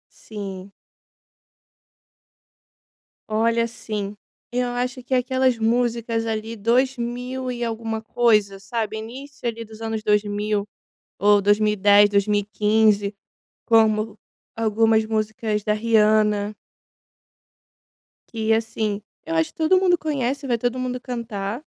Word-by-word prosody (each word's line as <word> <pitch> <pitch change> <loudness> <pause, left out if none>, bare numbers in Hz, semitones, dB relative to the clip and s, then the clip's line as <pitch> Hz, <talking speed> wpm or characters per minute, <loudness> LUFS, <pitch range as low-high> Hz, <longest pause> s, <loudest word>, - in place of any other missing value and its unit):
Sim. 195 -3 -8 2.6
Olha, 230 +2 +2
sim. 210 -3 -5 0.4
Eu 250 0 0
acho 250 +1 -3
que 255 - -4
é - - +5
aquelas 260 0 +1
músicas 230 0 0
ali 225 0 -3
2000 250 +2 -1
e 240 -1 -4
alguma 225 -1 -3
coisa 210 -4 +2
sabe, 220 +1 -3
início 250 +4 -7
ali 230 0 -3
dos 220 0 -13
anos 225 -1 -3
2000. 210 0 0 0.5
Ou 205 0 +5
2010, 205 0 +4
2015 210 0 +2 0.5
como 220 -1 +3 0.4
algumas 220 0 +2
músicas 215 0 -1
da 210 - +2
Rihanna. 215 -1 +2 1.7
Que 225 -1 0
assim 220 -2 -1 0.2
eu 165 - -3
acho 160 0 +1
que - - -45
todo 325 +4 +4
mundo 360 -2 +3
conhece 280 -3 -2
vai 240 -2 +1
todo 245 +2 -1
mundo 250 0 -3
cantar. 230 -2 -5
220 Hz, 110 wpm, -23 LUFS, 210-240 Hz, 2.6 s, é